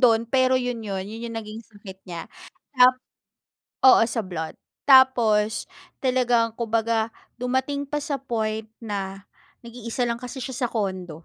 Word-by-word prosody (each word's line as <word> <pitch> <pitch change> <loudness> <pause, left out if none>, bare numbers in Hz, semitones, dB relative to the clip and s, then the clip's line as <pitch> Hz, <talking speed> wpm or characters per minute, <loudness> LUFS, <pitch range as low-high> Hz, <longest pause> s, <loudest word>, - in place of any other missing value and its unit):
dun, 230 -2 +4
pero 260 0 +3
yun 245 -3 -3
yun 195 -2 -3
yun 225 +2 -7
yung 230 - -6
naging 215 +1 -9
sakit 200 -3 -12
niya. 170 -2 -7 0.5
Tap 250 0 +7 0.9
oo, 260 - +8
sa 225 -1 -1
blood 160 -4 -5 0.3
tapos 230 -5 +5 0.4
talagang 245 -3 +2
kumbaga 230 -1 0 0.3
dumating 265 +3 -1
pa 295 - -1
sa 280 -4 -3
point 220 -4 -2 0.2
na 195 -2 -4 0.4
nag-iisa 235 +1 -3
lang 235 0 -2
kasi 250 +2 -7
siya 260 - -5
sa - - -7
condo, 185 -7 -3
230 Hz, 145 wpm, -24 LUFS, 210-250 Hz, 0.9 s, oo